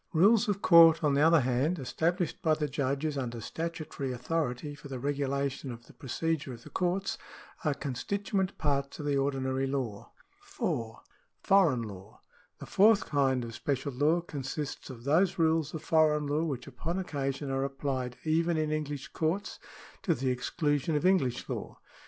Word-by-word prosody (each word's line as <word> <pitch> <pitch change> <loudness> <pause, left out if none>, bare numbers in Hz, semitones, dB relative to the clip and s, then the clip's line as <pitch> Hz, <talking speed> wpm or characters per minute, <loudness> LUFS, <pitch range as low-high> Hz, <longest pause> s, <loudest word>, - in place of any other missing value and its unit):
Rules 210 +7 +5
of 200 -1 -1
court, 165 -1 +8
on 145 -2 +3
the 140 - +3
other 165 0 +6
hand, 130 +7 +1
established 165 +5 -1
by 155 -1 +3
the 150 -1 -1
judges 140 +1 -1
under 120 -3 -4
statutory 155 0 -4
authority 125 +1 -2
for 145 - -11
the 135 -2 -5
regulation 140 0 -2
of 120 0 -10
the - - -17
procedure 155 0 -2
of 120 0 -11
the - - -12
courts, 185 +2 -1 0.4
are 150 -4 +1
constituent 190 - -2
parts 140 -2 -1
of 150 - -6
the 145 -1 +1
ordinary 135 -1 0
law. 130 -7 -4 0.3
4. 115 -1 -4 0.4
Foreign 160 -12 +4
laiv. 100 0 -10 0.2
— - - -33
The - - -7
fourth 210 +1 +4
kind 135 -4 +1
of 115 - -8
special 140 +4 -2
law 150 +7 +2
consists 145 -2 -5
of 120 -3 -9
those 170 +7 +2
rules 160 -2 +2
of 160 - -6
foreign 155 -2 +3
law, 150 +3 0
which 135 -6 -3
upon 150 +6 -4
occasion 140 -5 -3
are 135 0 0
applied 135 -2 -3
even 165 +1 +1
in 155 -1 0
English 145 -3 -3
courts 165 +6 -2 0.4
to 175 -6 +1
the 130 -1 0
exclusion 145 +4 0
of 150 - 0
English 140 -10 +2
law. - - -5
145 Hz, 170 wpm, -30 LUFS, 135-165 Hz, 0.4 s, court